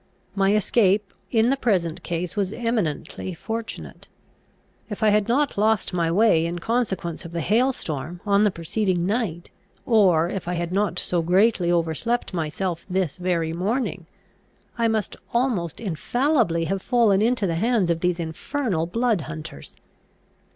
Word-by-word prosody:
My 200 Hz, +1 st, +2 dB
escape 205 Hz, -1 st, +2 dB, 0.2 s
in 230 Hz, +1 st, +3 dB
the -, -, +3 dB
present 185 Hz, -11 st, 0 dB
case 170 Hz, 0 st, -3 dB
was 200 Hz, -2 st, 0 dB
eminently 190 Hz, -7 st, -2 dB
fortunate. 225 Hz, +5 st, -6 dB, 0.8 s
If 210 Hz, 0 st, -4 dB
I 215 Hz, -, +5 dB
had 210 Hz, -1 st, +2 dB
not 265 Hz, -1 st, +1 dB
lost 215 Hz, -2 st, +2 dB
my 170 Hz, -2 st, +1 dB
way 195 Hz, -3 st, +4 dB
in 170 Hz, +1 st, -4 dB
consequence 190 Hz, -5 st, -2 dB
of 170 Hz, -1 st, -9 dB
the 170 Hz, -, -2 dB
hail 230 Hz, -, +2 dB
storm 155 Hz, -, -5 dB
on 200 Hz, 0 st, +3 dB
the 210 Hz, -, +4 dB
preceding 180 Hz, +1 st, -1 dB
night, 195 Hz, -5 st, -2 dB, 0.3 s
or 185 Hz, -8 st, +4 dB
if 185 Hz, -1 st, -5 dB
I 180 Hz, -, -1 dB
had 170 Hz, 0 st, -3 dB
not 200 Hz, 0 st, 0 dB
so 175 Hz, -1 st, 0 dB
greatly 180 Hz, +1 st, +3 dB
overslept 175 Hz, +9 st, 0 dB
myself 170 Hz, +1 st, -2 dB
this 185 Hz, -5 st, -1 dB
very 170 Hz, -3 st, -1 dB
morning, 190 Hz, -1 st, -2 dB, 0.7 s
I 230 Hz, -1 st, +1 dB
must 220 Hz, -3 st, -1 dB, 0.2 s
almost 230 Hz, -, 0 dB
infallibly 230 Hz, -, +1 dB
have 195 Hz, +3 st, -2 dB
fallen 220 Hz, -5 st, +3 dB
into 235 Hz, -1 st, +2 dB
the 170 Hz, -, 0 dB
hands 205 Hz, 0 st, +1 dB
of 165 Hz, -, 0 dB
these 180 Hz, 0 st, 0 dB
infernal 165 Hz, -, -2 dB
blood 230 Hz, 0 st, +1 dB
hunters. 155 Hz, -2 st, -8 dB
190 Hz, 150 wpm, -24 LUFS, 170-225 Hz, 0.8 s, I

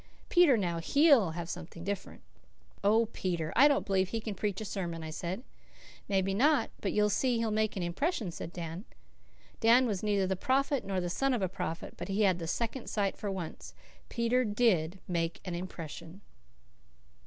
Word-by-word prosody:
Peter, 345 Hz, -9 st, +6 dB
now, 175 Hz, -5 st, -1 dB
HE'LL 270 Hz, -, +4 dB
have 170 Hz, -1 st, -4 dB
something 170 Hz, -1 st, -7 dB
different." 200 Hz, +1 st, -5 dB, 0.6 s
"Oh, 220 Hz, +3 st, +4 dB
Peter! 170 Hz, -4 st, -2 dB
I 280 Hz, +4 st, +8 dB
don't 285 Hz, -2 st, +2 dB
believe 190 Hz, -2 st, +1 dB
he 225 Hz, -, -2 dB
can 215 Hz, -1 st, -4 dB
preach 200 Hz, 0 st, -2 dB
a 220 Hz, -, -5 dB
sermon," 170 Hz, -5 st, -4 dB
I 160 Hz, -, -5 dB
said. 180 Hz, +8 st, -4 dB, 0.6 s
"Maybe 195 Hz, -1 st, +1 dB
not, 275 Hz, +3 st, +3 dB
but 195 Hz, -, -1 dB
you'll 210 Hz, 0 st, +2 dB
see 245 Hz, +3 st, +1 dB
he'll 230 Hz, -1 st, 0 dB
make 215 Hz, 0 st, 0 dB
an 185 Hz, -, -1 dB
impression," 210 Hz, -, -1 dB
said 165 Hz, -, -7 dB
Dan. 170 Hz, +3 st, -6 dB, 0.7 s
Dan 235 Hz, +3 st, +5 dB
was 205 Hz, -6 st, -1 dB
neither 205 Hz, -2 st, +1 dB
the 190 Hz, 0 st, 0 dB
prophet 270 Hz, +6 st, +1 dB
nor 195 Hz, -1 st, -2 dB
the 175 Hz, -, -2 dB
son 260 Hz, +10 st, +1 dB
of 215 Hz, -, -2 dB
a -, -, +2 dB
prophet, 180 Hz, -2 st, -5 dB
but -, -, -5 dB
he 200 Hz, +2 st, +1 dB
had 185 Hz, -3 st, +3 dB
the 165 Hz, -, -4 dB
second 235 Hz, +7 st, -3 dB
sight 200 Hz, -2 st, 0 dB
for 205 Hz, -, -4 dB
once; 165 Hz, -, -6 dB, 0.3 s
Peter 235 Hz, +2 st, +1 dB
DID 205 Hz, -6 st, +2 dB
make 165 Hz, -2 st, -1 dB
an 180 Hz, -, -4 dB
impression. 170 Hz, 0 st, -7 dB
195 Hz, 185 wpm, -31 LUFS, 175-230 Hz, 0.7 s, I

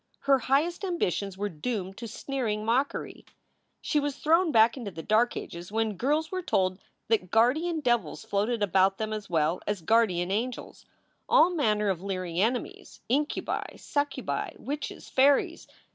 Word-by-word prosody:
Her 275 Hz, -1 st, +4 dB
highest 295 Hz, -, +1 dB
ambitions 200 Hz, -, -1 dB
were 205 Hz, +1 st, -1 dB
doomed 195 Hz, +2 st, -4 dB
to 230 Hz, -, -6 dB
sneering 225 Hz, -3 st, -3 dB
mockery. 255 Hz, +5 st, -1 dB, 0.6 s
She 300 Hz, -, +1 dB
was 290 Hz, -1 st, -2 dB
thrown 330 Hz, +3 st, +3 dB
back 225 Hz, -2 st, +5 dB
into 240 Hz, -6 st, -5 dB
the 165 Hz, -3 st, -8 dB
dark 220 Hz, +3 st, +2 dB
ages 175 Hz, +2 st, -7 dB
when 220 Hz, 0 st, 0 dB
girls 300 Hz, -, 0 dB
were 370 Hz, -1 st, -2 dB
told 185 Hz, -, 0 dB, 0.3 s
that 210 Hz, -5 st, +1 dB
guardian 305 Hz, -, +2 dB
devils 240 Hz, -3 st, 0 dB
floated 215 Hz, +2 st, 0 dB
about 195 Hz, 0 st, +3 dB
them 215 Hz, 0 st, -3 dB
as 210 Hz, -2 st, -6 dB
well 165 Hz, +1 st, +1 dB
as 205 Hz, -5 st, -2 dB
guardian 185 Hz, -4 st, +2 dB
angels 235 Hz, +5 st, -4 dB, 0.4 s
all 335 Hz, +3 st, +6 dB
manner 215 Hz, -, +1 dB
of 180 Hz, -3 st, -1 dB
leering 185 Hz, -3 st, -2 dB
enemies, 240 Hz, +4 st, -2 dB
incubi, 290 Hz, +5 st, -1 dB
succubi, 285 Hz, -1 st, -2 dB
witches, 290 Hz, +2 st, -6 dB
fairies. 275 Hz, +1 st, +2 dB
225 Hz, 150 wpm, -28 LUFS, 195-280 Hz, 0.6 s, all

